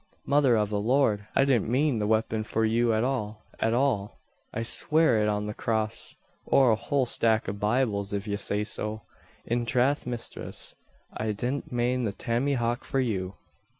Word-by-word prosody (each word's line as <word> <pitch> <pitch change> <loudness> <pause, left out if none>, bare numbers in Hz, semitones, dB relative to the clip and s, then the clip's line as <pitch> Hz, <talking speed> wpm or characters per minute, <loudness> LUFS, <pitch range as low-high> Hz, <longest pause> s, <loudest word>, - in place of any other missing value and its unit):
"Mother 140 -4 +4
av 105 -1 +1
the 105 - 0
Lard! 110 -3 +2
I 135 - +5
didn't 125 -6 +2
mane 130 0 +2
the 105 - 0
waypon 110 0 +1
for 110 +1 0
you 115 +1 +2
at 110 0 +1
all, 110 -5 -3
at 115 - +1
all! 120 -6 0 0.3
I'll 115 - -3
sware 155 -1 +2
it 105 - +2
on 105 0 -1
the 105 - -4
crass 110 0 -1 0.3
or 130 -3 +4
a - - +4
whole 130 +4 0
stack 115 -2 +1
av 100 +1 -4
Bibles 105 -2 0
if 100 +1 -3
yez 100 0 -2
say 105 +1 0
so. 105 0 -4 0.4
In 120 +1 0
trath 125 +4 +1
misthress; 120 -1 -4 0.4
I 110 -1 -1
didn't 130 +8 -3
mane 125 0 0
the 100 - -2
tammyhauk 120 0 -1
for 135 - -1
you!" 100 -7 -1
115 Hz, 180 wpm, -27 LUFS, 105-125 Hz, 0.4 s, I